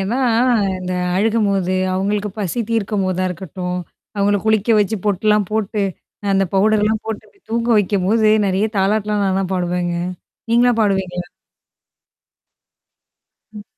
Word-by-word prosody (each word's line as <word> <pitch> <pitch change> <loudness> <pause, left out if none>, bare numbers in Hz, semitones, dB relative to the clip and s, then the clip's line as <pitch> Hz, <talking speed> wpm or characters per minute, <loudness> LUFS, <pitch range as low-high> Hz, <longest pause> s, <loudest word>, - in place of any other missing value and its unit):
ஏன்னா 205 +7 -1 0.6
இந்த 185 0 -4 0.2
அழுகும்போது, 200 -3 +1 0.2
அவங்களுக்கு 205 +2 -1
பசி 200 +4 -2
தீர்க்கும்போதா 195 -4 0
இருக்கட்டும். 180 0 -5 0.4
அவங்கள 205 +1 +2
குளிக்க 220 +1 +2
வச்சு 210 +2 0
பொட்டுலாம் 210 0 +2
போட்டு 215 -1 -1 0.5
அந்த 195 0 +3
பவுடர்லாம் 215 +2 +2
போட்டு 220 -2 -4
போய் 400 - -33
தூங்க 230 +1 -1
வெக்கும்போது 205 +2 +2 0.2
நெறைய 195 +3 +1
தாலாட்லாம் 210 +1 +1
நான் 190 0 +1
தான் 190 -1 -3
பாடுவேங்க. 175 -1 -1 0.6
நீங்கலாம் 240 0 +3
பாடுவீங்களா? 190 -4 -1 2.3
ம். 210 -1 -10
200 Hz, 115 wpm, -19 LUFS, 185-215 Hz, 2.3 s, அந்த